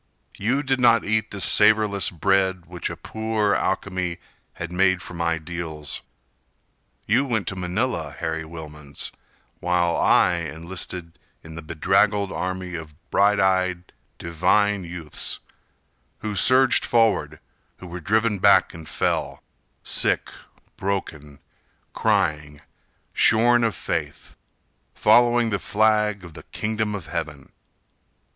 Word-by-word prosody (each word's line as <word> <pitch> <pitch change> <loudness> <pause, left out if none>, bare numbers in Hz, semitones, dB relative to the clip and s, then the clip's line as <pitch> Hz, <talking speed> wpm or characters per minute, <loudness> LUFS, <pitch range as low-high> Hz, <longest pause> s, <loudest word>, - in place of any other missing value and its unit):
You 125 +8 0
did 135 -1 0
not 120 -2 +4
eat 110 +1 0
the 100 - -7
savorless 105 -1 +3
bread 95 0 +1
Which 90 0 -5
a - - -7
poor 110 -2 -1
alchemy 90 -3 -1 0.4
had 85 0 -6
made 95 0 +2
from 85 -1 -8
ideals. 80 -2 -3 1.0
You 120 +6 +3
went 110 -8 -1
to 95 - -6
Manila, 90 - -2
Harry 80 +2 -4
Wilmans, 75 -3 -7 0.5
While 90 -1 +1
I 90 - +4
enlisted 85 +1 -6 0.2
in 80 - -11
the 80 - -7
bedraggled 95 +5 +1
army 90 -1 -4
Of 80 -3 -7 0.2
bright 100 +1 +3
eyed, 95 -2 0 0.2
divine 95 +4 +1
youths, 85 -3 -6 0.8
Who 105 -1 -3
surged 130 +5 +4
forward, 105 -11 +1 0.4
who - - -12
were 90 0 -7
driven 105 +3 +1
back 100 -1 +5
and 80 -2 -10
fell - - -2 0.4
Sick, - - +1 0.5
broken, 80 -7 -4 0.6
crying, 75 -9 0 0.5
shorn 120 +2 +4
of 115 -2 0
faith, 75 -3 -4 0.6
Following 120 -1 +4
the 100 - 0
flag 105 +1 +1
of 85 -2 -11
the - - -10
Kingdom 110 -1 -2
of 95 -6 -7
Heaven. 75 -5 -6
95 Hz, 120 wpm, -23 LUFS, 85-105 Hz, 1.0 s, back